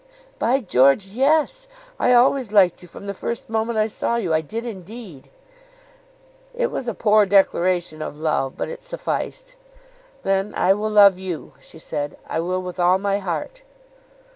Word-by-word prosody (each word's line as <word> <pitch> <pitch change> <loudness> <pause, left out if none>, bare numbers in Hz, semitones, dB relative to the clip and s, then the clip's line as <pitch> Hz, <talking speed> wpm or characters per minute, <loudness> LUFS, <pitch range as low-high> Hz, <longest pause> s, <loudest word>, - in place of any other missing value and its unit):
"By 265 +3 +2
George, 140 - +3
yes. 300 - +1 0.3
I - - +3
always 250 -1 +3
liked 190 -5 +4
you 180 - -13
from 185 - -12
the 200 - -4
first 225 +3 -5
moment 225 +1 -1
I 215 - +3
saw 225 +2 -2
you. 190 -9 -1
I 160 - +2
did 225 +9 -6
indeed." 195 - -9 1.3
It 485 0 -1
was 255 - -4
a 235 - -2
poor 210 -1 +4
declaration 180 -4 +2
of 150 - -6
love, 150 -4 -1
but - - -3
it 485 +1 -8
sufficed. - - -5 0.7
"Then 195 +1 0
I 190 - +4
will 210 +2 -2
love 200 -3 +6
you," 185 -4 -6
she - - -15
said. 145 -2 -5
"I - - -2
will 185 +2 -2
with 180 0 -7
all 180 +1 +4
my 200 +1 -1
heart." 195 - -5
200 Hz, 165 wpm, -22 LUFS, 180-235 Hz, 1.3 s, love